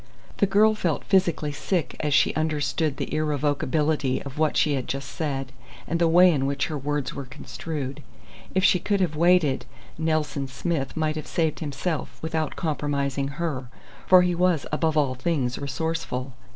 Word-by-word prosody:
The 200 - +3
girl 215 +3 +5
felt 175 -7 -1
physically 175 -6 +2
sick 165 +3 -2
as 150 - -1
she 145 - +4
understood 155 -1 0
the - - -4
irrevocability 150 -1 0
of 140 +1 -8
what 155 -1 +2
she 150 - +3
had 130 -3 -2
just 135 0 -4
said, 135 -4 -3 0.4
and 170 - -1
the 170 - +4
way 180 +2 +7
in 135 -4 0
which 140 0 0
her 155 - -3
words 145 -1 -2
were 140 - -6
construed. 140 +1 -6 0.5
If 190 - +3
she 180 - +5
could 200 +3 0
have 175 -5 0
waited, 165 -6 +3 0.3
"Nelson 155 -3 0
Smith" 135 +2 -3
might 155 -1 0
have 155 - -6
saved 160 -3 0
himself 150 +2 -3
without 160 -2 -2
compromising 140 -3 -1
her, 140 -7 -3 0.4
for 185 -1 +8
he 180 0 +1
was 175 -3 +2
above 155 0 +1
all 140 -4 +2
things 130 -2 -1
resourceful. 140 -3 -3
150 Hz, 165 wpm, -25 LUFS, 140-165 Hz, 0.5 s, for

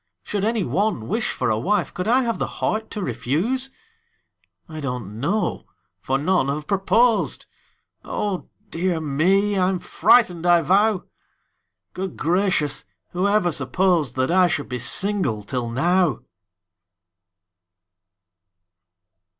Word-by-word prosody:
Should 205 -2 -3
any 220 -1 +1
one 200 - -1
wish 220 +4 -1
for 125 -3 -1
a 110 - 0
wife, 205 - 0
Could 180 - -4
I 255 +3 +4
have 230 -2 -2
the - - -1
heart 220 0 -2
to 210 - -4
refuse? 225 - -1 1.0
I 155 -2 -8
don't 125 -7 -5
know 200 - -1 0.3
for 135 - -1
none 155 0 +1
have 150 +2 -3
proposed 205 +6 +1 0.6
Oh, 200 -3 -3 0.2
dear 170 0 -1
me! 190 +7 +1
I'm 185 0 +2
frightened, 180 -3 +3
I 175 -1 +5
vow! 195 +3 +3 0.9
Good 190 -1 -5
gracious! 165 -5 0 0.3
who 180 +3 0
ever 200 -4 +2
supposed 155 0 0
That 130 +3 0
I 185 0 +5
should 150 -5 -3
be 125 -1 -3
single 125 - -1
till 120 +1 -3
now? 175 +6 +1
180 Hz, 125 wpm, -22 LUFS, 140-205 Hz, 1.0 s, I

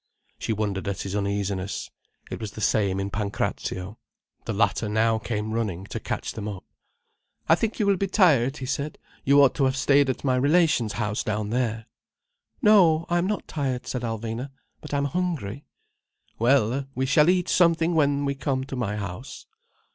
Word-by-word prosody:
She - - -2
wondered 100 -3 -2
at 100 -2 -2
his 95 0 -4
uneasiness. 100 -1 -2 0.4
It - - -4
was 110 -3 -6
the - - -8
same 100 -3 +1
in 100 0 -3
Pancrazio. 100 -1 -3 0.5
The 115 - -2
latter 105 +1 +1
now 110 +1 +2
came 110 -1 -3
running 100 -5 -2
to - - -2
catch - - -4
them 105 -2 -6
up. 100 -3 -7 0.8
"I 160 - +6
think 220 +6 0
you 210 - +2
will 200 -1 +3
be 195 - 0
tired," 150 - +3
he 130 - -5
said. 140 +3 -3 0.3
"You 140 +1 +6
ought 135 - +4
to 140 - +1
have 130 0 +1
stayed 140 0 +4
at 130 - -3
my 130 -2 +2
relation's 145 - +3
house 105 -1 -2
down 105 0 -2
there." 115 -2 -1 0.8
"No, 175 -7 +5
I 175 0 +2
am 175 - 0
not 210 0 -3
tired," 135 -5 -2
said 125 - -3
Alvina. 115 +2 -4 0.3
"But 150 - -9
I'm 140 -1 0
hungry." 145 - -3 0.7
"Well, 130 +2 +2
we 130 - 0
shall 150 +4 +4
eat 180 -1 +2
something 170 -1 +3
when 145 -2 +2
we 140 - 0
come 135 -1 -2
to 135 - -6
my 110 -5 -2
house." 100 +5 -7
125 Hz, 180 wpm, -25 LUFS, 105-145 Hz, 0.8 s, I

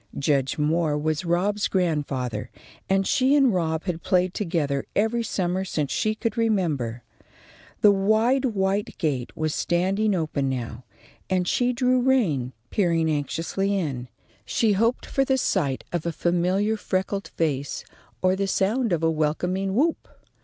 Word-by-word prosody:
Judge 140 -2 +1
Moore 155 0 +1
was 155 +3 -1
Rob's 195 +5 +1
grandfather, 140 - -1 0.4
and 195 0 +2
she 265 +6 +3
and 270 -6 +4
Rob 160 -3 0
had 175 -3 -3
played 180 -1 +1
together 160 -8 -1
every 225 +3 +1
summer 185 -4 -1
since 150 -6 -2
she 215 0 0
could 225 -1 -2
remember. 160 - 0 0.8
The 210 - +7
wide 220 +7 +2
white 200 -3 -1
gate 135 -6 -1
was 155 -1 -1
standing 195 +4 +1
open 155 -5 -1
now, 125 -1 -5 0.4
and 185 -2 +1
she 245 +5 +2
drew 250 0 +2
rein, 190 - +2 0.2
peering 165 -5 +2
anxiously 170 +7 -1
in. 135 -9 -3 0.4
She 220 - +1
hoped 230 +5 +1
for 270 - +1
the 265 0 +1
sight 150 - 0
of 175 -3 -2
a - - 0
familiar 180 +6 +1
freckled 195 0 -2
face 145 -4 -2 0.4
or 185 0 +4
the 195 0 -1
sound 215 +5 +1
of 165 -1 0
a 165 - +3
welcoming 180 +5 -1
whoop. 315 +7 +1
180 Hz, 145 wpm, -25 LUFS, 155-210 Hz, 0.8 s, The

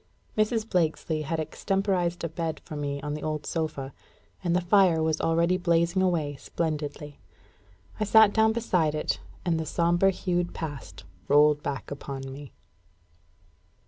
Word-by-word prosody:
Mrs. 215 +1 +1
Blakesley 160 -4 0
had 160 +2 -2
extemporised 180 +1 -1
a - - 0
bed 165 0 -3
for 155 - -7
me 140 -1 -3
on 145 +1 -3
the 150 - -5
old 155 -1 -3
sofa; 155 -5 -3 0.5
and 175 -1 +1
the - - +4
fire 175 -3 +4
was 160 -1 0
already 170 +2 +2
blazing 170 +1 +2
away 160 -6 0
splendidly. 150 -2 -4 0.8
I 215 - +1
sat 215 0 +6
down 220 0 +4
beside 180 -9 +1
it, 155 - -1 0.3
and 165 -2 +1
the 160 - -2
sombre 175 +4 +3
hued 175 -2 -1
Past 145 -9 -7 0.2
rolled 150 0 +5
back 140 -1 -5
upon 135 -1 -6
me. 140 0 -10
165 Hz, 145 wpm, -27 LUFS, 150-180 Hz, 0.8 s, sat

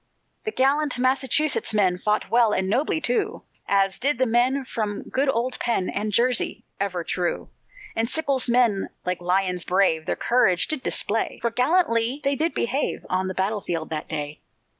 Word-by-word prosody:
The 435 - -1
gallant 285 -1 +1
Massachusetts 265 0 +2
men 185 -3 +2
Fought 210 +2 -1
well 230 -2 +4
and 190 0 0
nobly, 265 +10 0
too, 395 - -1 0.2
As 195 -1 +1
did 275 +1 +2
the 260 - +2
men 255 +3 +1
from 210 -4 -3
good 270 +1 -1
old 250 0 -1
Penn., 230 -6 -1
And 210 +1 -2
Jersey, 240 +3 +1
ever 185 -3 -2
true, 175 0 -3 0.4
And 225 +1 0
Sickles' 275 -4 +1
men 235 -5 +2 0.2
like 180 -1 -2
lions 180 0 0
brave, 180 -4 +1
Their - - 0
courage 195 -8 +2
did 310 -4 -2
display, 225 -2 0
For 235 - +1
gallantly 250 -2 +1
they 275 0 +1
did 320 +4 -1
behave 265 +5 -2
On 185 0 0
the 185 - -4
battle 200 +2 -1
field 165 -3 -4
that 155 -1 -4
day. 150 -1 -5
230 Hz, 170 wpm, -24 LUFS, 190-265 Hz, 0.4 s, well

